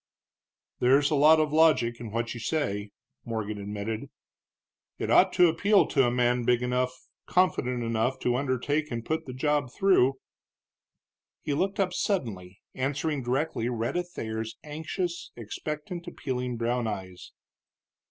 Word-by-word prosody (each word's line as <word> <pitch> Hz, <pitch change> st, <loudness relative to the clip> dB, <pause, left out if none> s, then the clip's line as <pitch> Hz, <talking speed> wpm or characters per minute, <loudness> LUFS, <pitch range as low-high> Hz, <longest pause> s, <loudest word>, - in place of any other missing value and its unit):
"There's 140 Hz, +4 st, +4 dB
a -, -, +3 dB
lot 155 Hz, +3 st, +6 dB
of 155 Hz, -1 st, +1 dB
logic 155 Hz, -7 st, +4 dB
in 115 Hz, -, -6 dB
what 115 Hz, +2 st, -2 dB
you 120 Hz, -, -7 dB
say," 105 Hz, -6 st, -2 dB, 0.3 s
Morgan 110 Hz, -3 st, -4 dB
admitted; 105 Hz, +2 st, -4 dB, 0.9 s
"it -, -, -2 dB
ought -, -, +6 dB
to 180 Hz, -, +6 dB
appeal 200 Hz, +5 st, +4 dB
to 135 Hz, -4 st, +3 dB
a -, -, +1 dB
man 125 Hz, 0 st, +2 dB
big 120 Hz, +1 st, +2 dB
enough, 125 Hz, +1 st, 0 dB, 0.4 s
confident 125 Hz, -9 st, +1 dB
enough, 115 Hz, +3 st, 0 dB
to 120 Hz, -, +1 dB
undertake 140 Hz, +3 st, 0 dB
and 115 Hz, -2 st, -4 dB
put 160 Hz, +2 st, -2 dB
the 130 Hz, -, -6 dB
job 145 Hz, -1 st, 0 dB
through." 185 Hz, -10 st, +3 dB, 1.3 s
He 145 Hz, -, -1 dB
looked 195 Hz, +8 st, -1 dB
up 185 Hz, -2 st, +1 dB
suddenly, 100 Hz, -, -2 dB
answering 145 Hz, +2 st, -1 dB
directly 125 Hz, -1 st, -1 dB
Rhetta 120 Hz, +8 st, -1 dB
Thayer's 110 Hz, -10 st, -5 dB
anxious, 160 Hz, +4 st, -4 dB
expectant, 150 Hz, -, -6 dB
appealing 125 Hz, -7 st, -3 dB
brown 120 Hz, 0 st, 0 dB
eyes. 95 Hz, -4 st, -6 dB
125 Hz, 140 wpm, -28 LUFS, 115-155 Hz, 1.3 s, lot